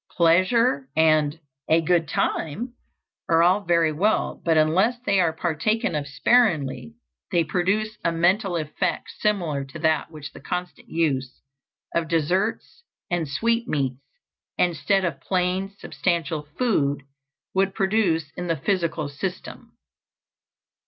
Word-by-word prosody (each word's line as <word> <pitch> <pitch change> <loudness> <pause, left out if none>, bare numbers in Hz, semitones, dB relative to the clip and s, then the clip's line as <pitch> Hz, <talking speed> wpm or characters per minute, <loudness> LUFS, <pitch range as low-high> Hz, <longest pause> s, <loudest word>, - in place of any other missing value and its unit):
Pleasure 175 - +3
and 155 -1 +3 0.3
"a 160 - +5
good 165 0 +1
time" 190 - -2 0.6
are 165 0 +5
all 185 +4 +4
very 170 -3 +2
well, 200 +8 0
but 165 -2 +2
unless 185 +10 +3
they 200 -1 +3
are 170 -3 +3
partaken 175 +7 -1
of 145 -2 -2
sparingly 165 - +1 0.4
they 175 -3 +3
produce 205 +6 -1
a 170 - +2
mental 180 +3 +2
effect 160 +3 -2
similar 175 -10 0
to 135 +3 -10
that 155 -1 +1
which 150 -2 -9
the - - -11
constant 180 0 -5
use 135 -6 -1 0.5
of 170 -1 0
desserts 180 - -1 0.3
and 175 -3 0
sweetmeats, 145 - -1 0.6
instead 180 +3 +1
of 170 - -3
plain 185 +1 0
substantial 165 -7 -2
food, 145 - +1 0.5
would 195 0 +1
produce 190 -7 +1
in 180 - -4
the 165 -1 0
physical 165 -2 -1
system. 175 +6 -7
170 Hz, 125 wpm, -24 LUFS, 155-195 Hz, 0.6 s, a